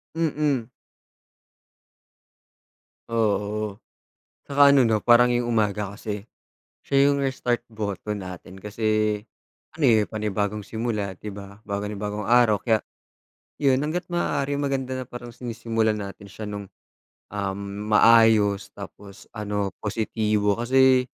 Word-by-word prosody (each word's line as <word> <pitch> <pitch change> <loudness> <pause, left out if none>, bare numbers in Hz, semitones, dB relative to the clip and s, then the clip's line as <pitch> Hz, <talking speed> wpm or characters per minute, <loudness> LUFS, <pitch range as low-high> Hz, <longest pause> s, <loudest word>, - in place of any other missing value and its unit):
Mm. 150 -7 0 2.4
Oo. 105 -2 -1 0.7
Saka 140 0 +5
ano, 140 -3 +6
'no, 110 -2 +2
parang 120 +2 +5
'yong 120 0 0
umaga 105 -3 0
kasi, 105 0 -6 0.6
siya 140 0 +4
'yong 140 - +2
restart 120 -2 -1
button 105 -2 -4
natin, 95 +1 -9
kasi 110 0 0 0.6
ano, 155 -3 0
eh 110 -2 +4
panibagong 105 -1 -2
simula, 105 -3 -3
'di 105 -1 -7
ba, 100 0 -10
bago 100 0 -3
na 105 - -6
bagong 105 0 -4
araw. 120 -5 +4
Kaya, 110 0 +3 0.8
'yon 135 -2 +4
hangga't 175 +4 -3
maaari 145 -5 -1
maganda 135 -2 -2
na 130 - -5
parang 120 0 -9
sinisimulan 115 -3 -2
natin 100 0 -8
siya 105 +1 -8
no'ng, 100 -1 -5 0.6
um, 100 -1 -3 0.3
maayos, 110 -3 +5
tapos 100 0 -11
ano, 105 -2 -3
positibo, 105 -1 0
kasi 130 +1 +4
110 Hz, 120 wpm, -24 LUFS, 105-120 Hz, 2.4 s, ano